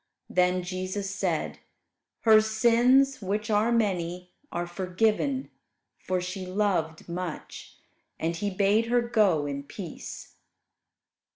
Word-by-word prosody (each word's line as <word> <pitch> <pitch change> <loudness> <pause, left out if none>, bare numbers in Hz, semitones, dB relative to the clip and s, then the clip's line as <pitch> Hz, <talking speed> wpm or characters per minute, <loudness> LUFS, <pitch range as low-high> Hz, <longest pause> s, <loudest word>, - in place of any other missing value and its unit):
Then 180 0 +2
Jesus 185 +2 -3
said, 180 -5 -2 0.6
"Her 220 -1 +7
sins 240 +4 +3
which 210 +3 -2
are 215 +3 +3
many 180 -5 -1 0.2
are 175 0 -2
forgiven, 210 +9 0 0.5
for 185 0 -1
she 185 +1 -5
loved 185 -4 -1
much"; 170 -2 -6 0.4
and 165 +1 -1
He 205 +4 -2
bade 200 +4 +2
her 240 0 +2
go 210 -10 +2
in 140 -1 -3
peace. 165 +4 -9
195 Hz, 110 wpm, -27 LUFS, 180-220 Hz, 0.6 s, Her